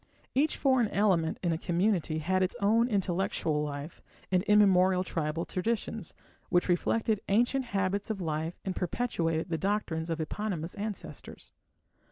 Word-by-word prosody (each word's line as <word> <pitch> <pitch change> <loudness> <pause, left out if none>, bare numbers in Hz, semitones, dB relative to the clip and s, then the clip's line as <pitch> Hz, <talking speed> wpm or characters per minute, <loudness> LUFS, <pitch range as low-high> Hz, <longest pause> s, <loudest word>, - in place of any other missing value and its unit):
Each 295 +4 +2
foreign 260 -4 +3
element 190 -6 +1
in 175 - +1
a 160 - -3
community 175 -3 +1
had 185 +4 0
its 185 - 0
own 225 +4 +3
intellectual 180 -6 0
life 145 +1 -5 0.3
and 185 -1 +3
immemorial 190 -3 +5
tribal 165 -1 -2
traditions, 220 +5 -3 0.3
which 175 - +2
reflected 210 +4 +1
ancient 245 +6 +2
habits 200 -2 -1
of 215 -3 -2
life 160 0 -3
and 190 -1 -2
perpetuated 170 -4 -1
the 165 -1 -1
doctrines 175 -4 -1
of 165 -1 -2
eponymous 170 0 -3
ancestors. 210 0 -7
185 Hz, 140 wpm, -30 LUFS, 165-210 Hz, 0.3 s, immemorial